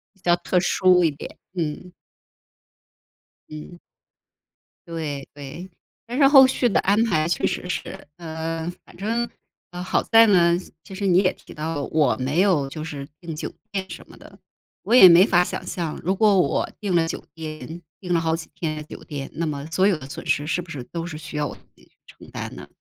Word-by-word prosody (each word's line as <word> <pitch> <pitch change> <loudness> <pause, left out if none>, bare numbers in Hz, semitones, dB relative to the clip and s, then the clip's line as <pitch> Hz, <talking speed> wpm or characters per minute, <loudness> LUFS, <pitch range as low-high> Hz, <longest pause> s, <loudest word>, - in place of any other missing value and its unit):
比 190 - -29
较 175 0 +3
特 180 +1 +1
殊 180 -1 +4
一 165 - +4
点， 140 - -10 0.2
嗯。 175 +1 -4 1.6
嗯。 155 +3 -10 1.1
对 150 -5 -5
对， 145 +6 -9 0.4
但 245 +3 -5
是 275 -2 +6
后 270 -2 +9
续 255 -1 +1
的 210 - +2
安 205 +3 +3
排 155 -7 +1
确 175 - +1
实 180 - -4
是， - - -5
呃， 165 0 -4 0.2
反 - - -17
正， 230 +4 -1 0.4
呃， 175 0 -6
好 - - 0
在 225 0 +6
呢， 175 -3 +4 0.3
其 195 - -12
实 200 +1 -2
你 180 0 +5
也 185 -2 +3
提 - - -15
到 150 -2 -3
我 145 -8 +2
没 140 +8 +1
有 170 -9 +2
就 155 +1 -6
是 145 -3 -6
订 165 -2 -6
酒 - - -5 0.2
店 190 -1 -3
什 - - -9
么 - - -14
的。 - - -15 0.4
我 - - -2
也 220 -7 +10
没 175 +3 +8
法 180 -3 +3
想 - - -5
象 165 -4 -4
如 185 +3 +1
果 205 -1 +4
我 - - 0
订 200 -3 -1
了 165 -1 +3
酒 - - -5
店 160 +1 -8 0.2
订 180 -2 -2
了 165 - +3
好 160 0 0
几 165 - -8
天 155 -2 -3
的 150 - -6
酒 - - -11
店， 140 -3 -6
那 170 - -2
么 145 -2 -4
所 190 +4 +3
有 190 -6 +2
的 135 -2 -11
损 165 +2 -8
失 145 - +1
是 175 +3 -1
不 170 - -14
是 140 -6 -6
都 170 +5 -6
是 155 -3 -6
需 155 -1 -8
要 150 - 0
我 - - -8
自 - - -21
己 - - -23
去 - - -34
承 - - -16
担 - - -6
呢？ - - -10
170 Hz, 225 characters per minute, -23 LUFS, 155-185 Hz, 1.6 s, 也